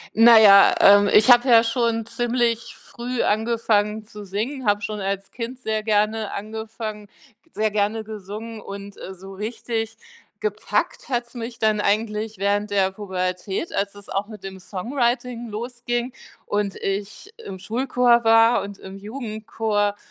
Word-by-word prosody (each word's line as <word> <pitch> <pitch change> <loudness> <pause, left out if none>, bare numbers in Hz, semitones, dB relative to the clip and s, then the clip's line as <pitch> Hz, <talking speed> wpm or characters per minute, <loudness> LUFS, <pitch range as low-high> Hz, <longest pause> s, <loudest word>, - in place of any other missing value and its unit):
Na 230 0 +8
ja, 200 -2 +8
ähm, 205 0 +7
ich 220 +4 +6
habe 245 +2 +6
ja 230 -1 +7
schon 230 -1 0
ziemlich 235 -1 -1
früh 245 0 -4
angefangen 215 -1 +1
zu 210 -1 -10
singen, 220 +6 -4
habe 205 0 +2
schon 210 0 -4
als 195 0 -3
Kind 245 +2 -6
sehr 220 -3 -2
gerne 215 0 0
angefangen 215 0 -6 0.4
sehr 215 0 0
gerne 210 +2 0
gesungen 215 +1 -8
und, 200 0 -9
äh, 190 - -7
so 190 +1 -11
richtig 225 +2 -4 0.4
gepackt 215 +5 -2
hat 240 -1 -1
es 235 - -17
mich 235 0 -6
dann 215 -1 +2
eigentlich 215 0 -1
während 205 +1 0
der 190 -1 +2
Pubertät, 190 - -3
als 200 0 -1
es 200 -1 -13
auch 195 +1 -1
mit 215 -3 -11
dem 190 -1 -8
Songwriting 240 +4 -2
losging 240 +2 -4 0.3
und 205 -1 -1
ich 200 - -4
im 190 - -9
Schulchor 240 +2 +2
war 225 +1 +5
und 200 0 -8
im 190 +1 -10
Jugendchor, 215 -2 -2
215 Hz, 150 wpm, -23 LUFS, 205-235 Hz, 0.4 s, Na